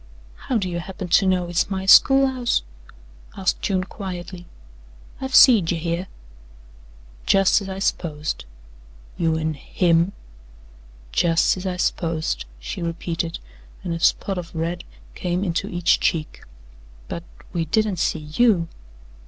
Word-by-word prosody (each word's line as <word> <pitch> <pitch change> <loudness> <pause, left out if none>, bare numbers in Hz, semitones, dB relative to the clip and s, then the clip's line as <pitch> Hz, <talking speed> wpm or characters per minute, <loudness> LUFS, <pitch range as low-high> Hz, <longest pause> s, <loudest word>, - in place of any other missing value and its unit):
"How 250 - +1
do 195 -4 -1
you 175 -1 -3
happen 185 +1 -7
to 195 +3 +4
know 185 -1 +2
hit's 175 +2 0
my 190 -1 -3
school 270 +7 +7
house?" 255 -3 0 0.7
asked 190 -2 0
June 185 -2 0
quietly. 180 -2 -7 0.7
"I've 265 0 -2
seed 220 -11 +7
you 175 - 0
hyeh." 170 +2 -2 1.2
"Jus' 195 +2 +4
as 195 - -7
I 190 - -5
s'posed." 155 - -2 0.7
"You 160 -1 0
an' 160 0 -1
HIM." 170 +5 +1 1.0
"Jus' 165 - +3
as 185 +1 -5
I 180 -1 -3
s'posed," 165 -2 -1
she - - -6
repeated, 170 0 -3 0.5
and 175 -3 -3
a 165 - -3
spot 190 +3 +1
of 170 -1 -9
red 170 +2 -3 0.3
came 180 +1 -2
into 175 -3 -1
each 175 -1 +2
cheek. 155 -2 -2 0.6
"But 170 - -5 0.3
we 170 -2 -1
didn't 210 +3 0
see 160 -2 -1
YOU." 200 -8 +3
175 Hz, 135 wpm, -22 LUFS, 165-195 Hz, 1.2 s, school